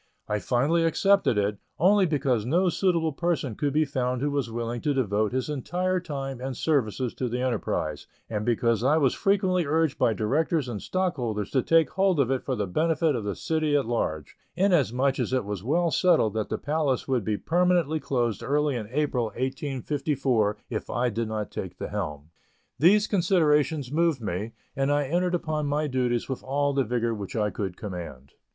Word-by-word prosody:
I 105 0 -1
finally 140 - +1
accepted 165 - +3
it, 100 0 0 0.2
only 195 +2 +4
because 135 -7 +1
no 175 - +2
suitable 170 -3 +1
person 160 -5 -1
could 145 +6 -1
be 155 +2 +2
found 125 -3 -1
who 145 - 0
was 140 -4 -1
willing 115 +1 -3
to 145 -2 0
devote 105 -4 +1
his 130 0 -1
entire 180 +6 -1
time 135 -7 -5
and 130 -1 -4
services 130 -5 0
to 125 - -3
the 125 +2 -2
enterprise, 125 -4 -2 0.2
and 105 -2 -3
because 115 -1 +1
I 145 +4 +4
was 140 -5 +3
frequently 190 -4 +1
urged 160 0 +1
by 115 - +3
directors 145 - 0
and 110 -4 -5
stockholders 125 - -2
to 130 - +2
take 165 +3 +3
hold 190 -4 +2
of 135 -2 +2
it 130 - 0
for 130 - -2
the 105 -3 -1
benefit 160 - +1
of 115 - -3
the 100 -1 -3
city 155 -2 0
at 140 - +2
large, 80 -11 -2 0.2
inasmuch 140 - +2
as - - -1
it 130 -5 +1
was 100 -2 -5
well 165 +7 +1
settled 160 - +3
that 110 -1 -2
the - - -1
Palace 145 -3 -1
would 130 -5 +1
be 105 +1 -1
permanently 175 - +1
closed 120 -8 -1
early 145 0 +1
in 110 -4 -4
April, 135 -2 0
1854, 130 -2 -1
if - - -4
I 125 0 0
did 115 +1 -2
not 110 -1 -4
take - - -6
the - - -5
helm. 75 +1 -5 0.5
These 205 +7 +5
considerations 155 - +2
moved 165 -2 +2
me, 105 +1 -4 0.2
and 135 +1 +1
I 145 0 +2
entered 175 +5 0
upon 155 -3 -2
my 150 +2 0
duties 125 -4 0
with 130 - -4
all 140 +2 0
the 135 -1 +2
vigor 115 0 -1
which 100 -3 -6
I 105 -2 0
could 95 -4 -4
command. 85 - -7
135 Hz, 190 wpm, -26 LUFS, 115-160 Hz, 0.5 s, These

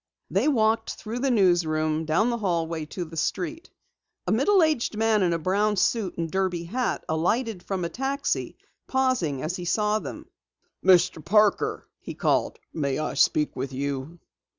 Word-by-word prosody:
They - - +2
walked 225 -5 +2
through 225 +3 -6
the 270 +2 +1
newsroom, 160 -7 +2
down 170 +10 +2
the 235 - -2
stairway 165 -5 -1
to 175 +3 -5
the 165 0 -11
street. 195 - -3 0.6
A - - -1
middle 400 -4 +4
aged 295 -9 0
man 220 -1 +2
in 180 -2 +2
a 170 - +1
brown 200 +5 +1
suit 200 0 0
and 165 -1 -3
derby 185 -3 -1
hat 245 +9 -2
alighted 190 +6 0
from 185 -1 -3
a - - -2
taxi, 270 +5 -2 0.3
pausing 255 - 0
as 165 +4 -2
he 180 - -6
saw 210 +4 +1
them. - - -8 0.6
"Mr. 175 -4 +4
Parker!" 210 +3 +2
he - - -8
called. - - +1 0.2
"May 140 -4 -1
I 155 - -2
speak 150 -1 +2
with 135 +1 -4
you?" 140 +4 -4
185 Hz, 165 wpm, -25 LUFS, 160-225 Hz, 0.6 s, middle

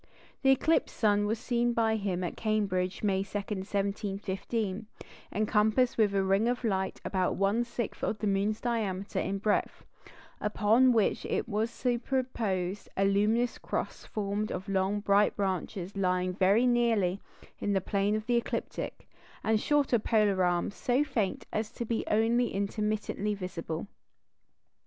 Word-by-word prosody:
The 270 - +3
eclipsed 290 +5 +2
sun 205 -1 +3
was 220 +2 0
seen 240 0 0
by 225 -1 +2
him 195 -4 -2
at 175 - -3
Cambridge, 200 -4 -1
May 195 -2 +2
2, 195 +1 -4
1715, 200 +1 -3 0.4
encompassed 215 +4 +2
with 210 -3 +2
a 195 - +3
ring 195 +4 +2
of 245 +1 -1
light 190 -4 -1
about 185 -2 0
one 200 +5 +2
sixth 235 -2 -5
of 215 - 0
the 215 - -3
moon's 205 +2 +1
diameter 205 -5 -2
in 195 +1 -1
breadth, 205 +1 -1 0.5
upon 220 +4 +4
which 225 -4 +1 0.2
was 220 0 -1
superposed 235 -7 -2
a 195 - +3
luminous 215 +5 +2
cross - - -4
formed 210 0 -2
of 185 +1 -5
long 195 +1 0
bright 205 0 +3
branches 190 -1 -3
lying 185 -1 +1
very 200 +5 +3
nearly 225 -6 +2 0.4
in 205 - 0
the 195 - +3
plane 200 +2 0
of 215 0 -3
the 240 0 +2
ecliptic, 235 - -4 0.4
and 220 -1 +2
shorter 285 -5 +2
polar 210 -3 +2
arms 175 +2 +1
so 250 +6 +1
faint 235 -10 -2
as 215 0 -1
to 235 - -5
be 230 0 -1
only 230 +3 +2
intermittently 210 +1 -1
visible. 175 -4 -5
210 Hz, 145 wpm, -30 LUFS, 195-230 Hz, 0.5 s, upon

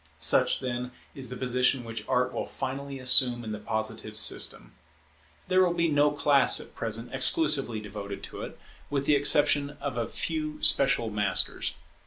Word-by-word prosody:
Such, - - +2
then, 125 -1 -4 0.2
is 130 -3 -4
the 125 - -6
position 125 0 +1
which 115 -2 -7
Art 125 0 0
will - - -4
finally 135 +1 -6
assume 125 -1 +3
in 110 - -6
the 105 - -5
Positive 110 0 -3
system. 105 - 0 0.7
There 185 0 +3
will 175 -1 0
be 170 -1 +1
no 145 0 +3
class 145 -2 +3
at - - -10
present, 115 +2 -4
exclusively 135 - +2
devoted 100 -1 -8
to - - -8
it, - - -8 0.3
with 140 -1 -2
the 150 - +3
exception 145 0 +3
of 140 -3 -5
a 115 -1 -2
few 155 +2 -4
special 125 -5 +3
masters. 105 -1 0
130 Hz, 165 wpm, -27 LUFS, 115-145 Hz, 0.7 s, assume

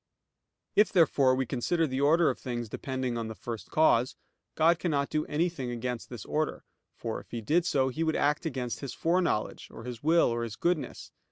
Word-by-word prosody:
If 210 0 +5
therefore 140 -7 +4
we 130 0 0
consider 160 +8 0
the 130 -2 -2
order 160 +3 +4
of - - -8
things 120 -3 -4
depending 130 0 -3
on 115 - -3
the 110 - -6
first 115 -1 -7
cause, 130 -5 +3 0.4
God 165 +1 +4
cannot 145 -5 0
do 155 0 0
anything 155 -4 -1
against 120 0 -4
this 120 -5 -8
order; 155 0 -2 0.3
for, - - -4
if - - -23
He 120 - -4
did 165 +10 +2
so, 130 -4 +2
He 155 +6 -2
would 160 -1 +1
act 150 +3 +1
against 125 -5 -3
His 140 -3 -6
foreknowledge, 170 -10 0
or - - -10
His 120 -1 -7
will, 165 0 +4
or 120 0 -1
His 115 -2 -4
goodness. 170 +2 -2
140 Hz, 195 wpm, -29 LUFS, 120-160 Hz, 0.4 s, If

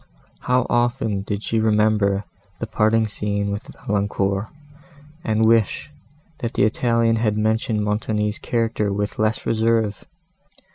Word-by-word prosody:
How 125 0 +1
often 120 -4 0
did 105 +1 -4
she 115 - 0
remember 105 -2 +2 0.3
the - - -3
parting 110 0 +2
scene 100 -1 -2
with 100 +1 -5 0.2
Valancourt, 100 0 0 0.8
and 110 0 +2
wish, 110 -3 +2 0.5
that 115 - -4
the - - +3
Italian 115 +1 +2
had 110 -2 0
mentioned 110 0 0
Montoni's 105 0 -1
character 115 -3 -1
with 105 +1 -3
less 110 +1 0
reserve! 110 -2 +1
110 Hz, 125 wpm, -22 LUFS, 105-115 Hz, 0.8 s, the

